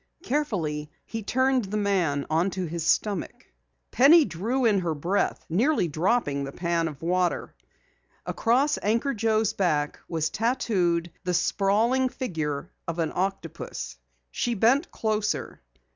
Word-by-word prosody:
Carefully 170 - -1 0.2
he 225 0 -5
turned 260 +2 +1
the 205 +2 -3
man 180 -9 +1
upon 165 +6 +1
his 170 -3 +1
back. 200 - -6 0.4
Penny 295 +6 +7
drew 225 +9 -1
in 210 -4 +4
her 170 -3 -1
breath, 175 +7 -1
nearly 220 - +2
dropping 155 -2 0
the 135 - -5
pan 170 +1 -1
of 150 -1 -8
water. 180 +1 0 0.7
Across 265 +6 +1
Anchor 230 +7 +1
Joe's 220 -1 +1
back 150 -6 0
was 160 -1 -1
tattooed 185 -8 0
the 180 -1 0
sprawling 220 +9 +2
figure 160 - -4 0.2
of 165 0 -3
an 165 -2 0
octopus. 165 - -4 0.3
She 240 -1 -1
bent 245 - +3
closer. 215 -1 -2
195 Hz, 130 wpm, -26 LUFS, 165-230 Hz, 0.7 s, Penny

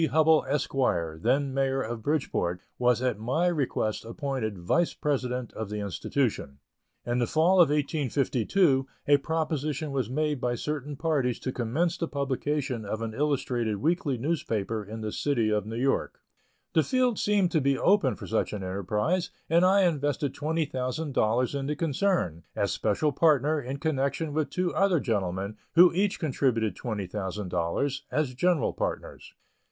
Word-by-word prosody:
Hubbell, 160 0 +4
Esq., 145 0 -1 0.5
then 140 +4 +1
Mayor 135 0 +1
of 115 0 -5
Bridgeport, 105 - -1 0.2
was 125 0 +2
at 125 -5 0
my 130 +10 0
request 140 -10 0
appointed 115 - -3
Vice 125 - +1
President 125 -4 -2
of 110 -2 -5
the 105 - -4
institution. 100 - -2 0.5
In 120 +1 0
the 120 - +1
fall 175 +4 +4
of 165 - +5
1852 140 - +1 0.2
a 145 0 +6
proposition 155 -1 -2
was 130 -5 -1
made 150 0 -1
by 120 -1 0
certain 150 +2 -4
parties 140 -6 0
to 130 - -2
commence 140 +9 -1
the 165 - -1
publication 140 -3 -2
of 110 +2 -4
an 110 -1 -4
illustrated 125 -5 0
weekly 155 - 0
newspaper 115 -7 -2
in 110 +2 -7
the 110 -1 -3
City 120 -6 0
of 105 0 0
New 110 - -5
York. 135 +3 0 0.5
The 160 - +5
field 250 - +1
seemed 200 -4 +2
to 160 - +2
be 135 0 +2
open 175 - +3
for - - -9
such 110 - -1
an 100 -2 -4
enterprise, 105 - -1 0.2
and 170 +2 +5
I 195 +2 +5
invested 145 -5 0
twenty 160 +2 -1
thousand 135 +2 -3
dollars 120 +3 +1
in 140 -1 -2
the 150 - -1
concern, 155 - 0
as - - 0
special 110 +8 +1
partner, 150 0 +3
in 130 +2 -5
connection 145 +1 -1
with 155 -1 0
two 180 -1 -1
other 195 -4 +3
gentlemen, 100 -3 -2 0.2
who 175 +1 +8
each 195 +3 +1
contributed 125 - 0
twenty 110 -5 -4
thousand 95 0 -4
dollars, 90 +12 -1
as 150 -4 0
general 165 +1 +1
partners. - - -5
135 Hz, 160 wpm, -27 LUFS, 115-155 Hz, 0.5 s, who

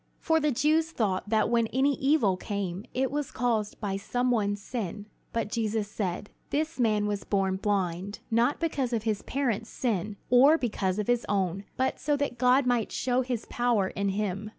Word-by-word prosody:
For 320 -1 +2
the 300 -1 +1
Jews 310 +5 +2
thought 205 -9 -1
that 220 -1 +3
when 235 -1 +2
any 270 +5 +2
evil 270 -9 +3
came, 195 0 -4
it 265 +1 0
was 290 -1 -2
caused 225 -3 -1
by 195 -2 -2
some 245 +5 0
one's 205 -3 +1
sin. 205 -2 -5 0.3
But 230 -2 -2
Jesus 220 -2 -1
said: 195 -1 -3 0.2
"This 310 +1 -1
man 215 -3 +2
was 205 -1 -2
born 190 -2 0
blind, 195 -1 -1
not 235 +5 +2
because 280 -7 -1
of 225 -2 0
his 215 -2 -1
parents' 240 -5 -2
sin, 210 -4 -2 0.2
nor 275 +6 +7
because 200 - -1
of 210 - -1
his 245 +1 +1
own, 195 -1 0
but 260 +1 0
so 290 +1 +1
that 280 -4 -2
God 255 +2 +4
might 245 -3 +1
show 250 0 +1
his 245 -3 -3
power 235 -6 +1
in 200 0 -1
him. 200 +1 -2
225 Hz, 185 wpm, -28 LUFS, 200-255 Hz, 0.3 s, nor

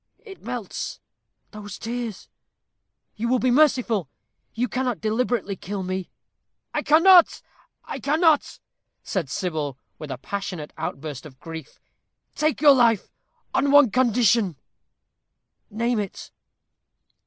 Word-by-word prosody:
It 390 -3 -12
melts 235 -5 -5 0.5
those 205 -1 -8
tears 230 -3 -5 0.9
you 230 +2 -2
will 255 +2 +3
be 250 0 +1
merciful. 245 - +2 0.5
You 245 +2 0
cannot 250 0 -2
deliberately 220 -2 -1
kill 195 +1 -5
me." 185 0 -4 0.6
"I - - 0
cannot 345 +3 +6 0.4
I - - -6
cannot!" 310 +1 +2 0.5
said 175 -9 -3
Sybil, 150 -4 -3 0.2
with 155 -1 -7
a 130 - -4
passionate 180 0 -5
outburst 150 0 -6
of 130 -3 -18
grief. 160 -3 -9 0.5
"Take 305 -1 0
your 290 -2 +8
life 235 -6 +2 0.4
on 280 +1 +2
one 285 -5 +6
condition." 230 -6 +3 1.1
"Name 230 +2 0
it." 200 -2 -6
225 Hz, 115 wpm, -24 LUFS, 185-255 Hz, 1.1 s, your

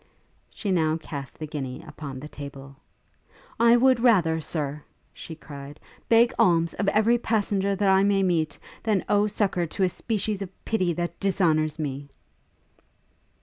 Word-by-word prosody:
She 205 - -4
now 160 -3 +2
cast 140 -4 -8
the 155 - -5
guinea 135 -4 -6
upon 145 -3 -8
the 150 - -8
table. 140 -2 -10 0.8
'I 235 +1 +6
would 260 0 +4
rather, 180 -10 +3
Sir,' 150 -2 -4 0.3
she 160 - -9
cried, 145 -2 -10 0.3
'beg 235 +1 +5
alms 165 -2 +3
of 200 - -2
every 220 +4 +3
passenger 200 -3 0
that 200 +1 0
I 190 0 +5
may 200 -1 +2
meet, 165 -4 0 0.2
than 210 -4 0
owe 205 0 +3
succour 195 -4 0
to 190 +5 -2
a 185 - +3
species 210 +1 -2
of 190 -1 -9
pity 185 -6 +1
that 175 +1 -4
dishonours 160 -6 +1
me!' 140 -2 -4
175 Hz, 150 wpm, -25 LUFS, 155-205 Hz, 0.8 s, I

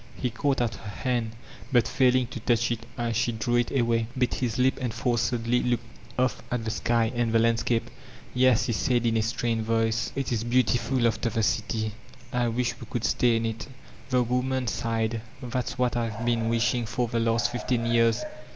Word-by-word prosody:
He 125 - -2
caught 135 +3 0
at 115 -2 0
her 110 - -9
hand, 115 0 -2 0.4
but 120 -4 +4
failing 130 -1 +3
to 125 - -6
touch 120 +1 +1
it 115 0 -4
as 120 -2 -1
she 120 +1 +1
drew 120 +2 0
i* 120 - +2
away, 115 -2 +1
bit 125 -1 +1
his 120 -2 -1
lip 130 +2 +2
and 125 -3 -1
forcedly 120 +1 0
looked 120 -1 0 0.3
off 130 0 +1
at 120 -2 -2
the 110 - -1
sky 115 0 +1
an! 120 -2 0
the 115 - +4
landscape: 115 0 +1 0.5
''Yes," 125 -3 +4
he 120 - 0
said 120 +2 +1
in 115 -1 +2
a 110 - +3
strained 115 0 -1
voice, 115 0 0
"it 135 -2 -1
i - - +2
The - - +1
Tuumph 110 - -4
of 120 - -3
Youth 125 -1 +4
455 125 +1 0
bcMtiftil, - - +4
after 115 +1 0
the 110 0 -1
city. 110 0 0 0.4
I 120 -1 +1
wish 120 0 -1
we - - -8
could 120 - -3
stay 120 -2 +3
m 115 0 0
it 115 0 -4 0.4
The 125 -1 +3
woman 125 +2 0
sighed: 115 0 -1 0.2
''That's 125 +1 -3
what 125 -1 +1
I 115 -1 0
have 115 +1 -5
been 115 -1 +1
wishing 115 0 +1
for 120 +2 0
the 115 0 -1
last 115 +1 +1
fifteen 125 -1 -1
years." 115 0 +2
120 Hz, 215 wpm, -27 LUFS, 115-125 Hz, 0.5 s, but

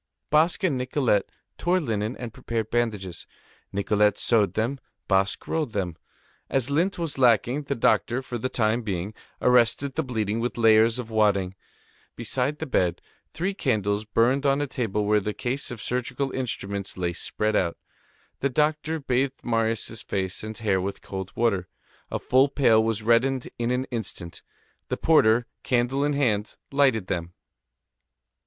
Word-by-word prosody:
Basque 160 +5 +3
and 150 -9 +1
Nicolette 125 -5 +1 0.3
tore 175 +2 +2
up 180 - -1
linen 110 -1 -2
and 120 -3 -6
prepared 115 -2 -3
bandages; 105 -7 -2 0.4
Nicolette 105 +1 +2
sewed 110 -4 +2
them, 120 +5 -1 0.3
Basque 95 +1 +1
rolled 155 -8 -1
them. 90 -5 -2 0.5
As 135 0 0
lint 175 +7 +1
was 165 -5 -4
lacking, 125 +3 +3
the 140 - -1
doctor, 120 +1 +2
for 120 -2 -5
the 130 - -2
time 115 0 +1
being, 100 -2 -3 0.3
arrested 125 +2 +3
the 160 - 0
bleeding 110 -5 -2
with 120 +1 -2
layers 115 0 +5
of 120 -3 -6
wadding. 100 -4 +2 0.6
Beside 125 +5 -1
the 160 - -4
bed, 90 - +1 0.3
three 185 +5 -2
candles 105 - 0
burned 115 +6 +2
on 140 0 +3
a 145 - 0
table 110 -6 -2
where 105 +1 +4
the 105 +1 -4
case 130 +3 -2
of 120 - -7
surgical 125 +4 -2
instruments 100 -7 -3
lay 90 -1 -1
spread 105 +4 -1
out. 85 -4 +1 0.6
The 140 - +1
doctor 155 +3 0
bathed 135 0 -1
Marius' 115 -1 -1
face 95 -1 -3
and 110 0 -6
hair 100 -5 +1
with 100 +2 -5
cold 95 -1 -6
water. 100 -6 +1 0.4
A - - -2
full 130 +2 +3
pail 120 -6 +4
was 110 -1 -1
reddened 125 +3 +2
in 120 0 0
an 125 +1 0
instant. 95 -7 -6 0.5
The - - -2
porter, 120 -7 +4 0.2
candle 130 +3 +1
in 145 0 +1
hand, 110 -7 0 0.2
lighted 135 -8 +3
them. 85 -1 -3
115 Hz, 160 wpm, -25 LUFS, 105-135 Hz, 0.6 s, layers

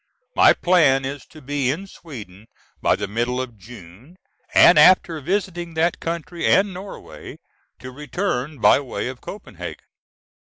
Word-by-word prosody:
My - - +6
plan 145 -7 +3
is 140 +1 -6
to 155 -2 -15
be 140 -1 -1
in 165 +9 -3
Sweden 110 - -12 0.3
by - - +3
the - - -4
middle 120 +4 -2
of 130 -3 -5
June, 110 - -14 0.4
and 165 - +7
after 165 -1 +5
visiting 175 -1 -3
that 165 +2 +1
country 170 +1 -5
and 195 0 +3
Norway, 190 +2 -10 0.4
to 130 - -10
return 150 0 -3
by 120 - +5
way 130 -2 -4
of 130 -1 -9
Copenhagen. 210 - -9
145 Hz, 145 wpm, -21 LUFS, 125-175 Hz, 0.4 s, and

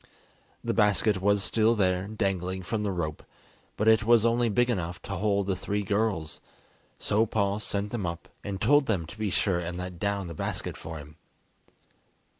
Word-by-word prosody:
The - - 0
basket 105 -1 +3
was 100 0 +3
still 115 +2 +3
there, 95 -2 +1
dangling 95 -3 -2
from 105 +5 -2
the 105 -1 -1
rope, 80 -4 -3 0.6
but 105 - 0
it 110 0 +6
was 115 0 +5
only 120 0 +3
big 120 +4 +3
enough 90 -7 -2
to 100 - -5
hold 100 0 +1
the 95 -1 0
three 100 +2 -2
girls, 100 -7 -1 0.6
so 110 +2 +1
Paul 100 -1 0
sent 105 -1 -2
them 105 -7 -2
up, 85 0 -5 0.2
and 100 -1 -4
told 140 +6 +4
them 95 -7 0
to 80 - -10
be 110 -2 0
sure 90 -1 +1
and 85 0 -4
let 90 -1 -6
down 100 0 -1
the 85 - -6
basket - - -3
for 80 0 -7
him. 75 0 -11
100 Hz, 185 wpm, -28 LUFS, 90-110 Hz, 0.6 s, it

